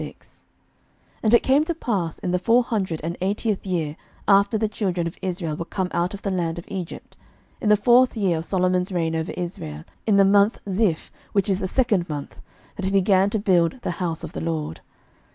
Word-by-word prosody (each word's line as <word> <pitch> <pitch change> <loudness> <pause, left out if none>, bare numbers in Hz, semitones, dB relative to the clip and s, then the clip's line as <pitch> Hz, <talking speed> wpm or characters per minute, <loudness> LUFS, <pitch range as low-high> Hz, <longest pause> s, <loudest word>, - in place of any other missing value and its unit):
11:006:001 - - -11 0.8
And 220 0 +2
it - - +4
came 275 +3 +4
to 335 +1 -2
pass 195 - -2
in 180 - -3
the 180 - +1
four 235 +5 +4
hundred 190 -9 -2
and 170 +2 -3
eightieth 200 +1 -1
year 160 -5 -1 0.3
after 200 +2 +4
the 220 0 +1
children 185 -5 -2
of 170 - -4
Israel 175 -4 -2
were 170 - -4
come 185 0 -2
out 175 +4 -1
of 200 - -12
the 200 - -1
land 170 -3 -1
of 170 - -7
Egypt, 185 -4 -7 0.5
in 210 - +1
the 210 - +6
fourth 245 +3 +4
year 185 -6 +1
of 160 - -6
Solomon's 185 0 +1
reign 165 -3 0
over 160 +2 -2
Israel, 80 - -5 0.2
in 205 -2 +4
the 195 - +6
month 200 +2 +4
Zif, 190 -4 0 0.2
which 200 -2 +2
is 195 -2 +1
the 190 - -2
second 205 -6 +1
month, 145 -2 -6 0.4
that 195 - -3
he - - +1
began 195 0 +3
to 220 - -1
build 185 +1 +2
the - - -1
house 165 -2 -2
of - - -7
the - - -4
LORD. 160 - -3
190 Hz, 210 wpm, -23 LUFS, 170-205 Hz, 0.8 s, the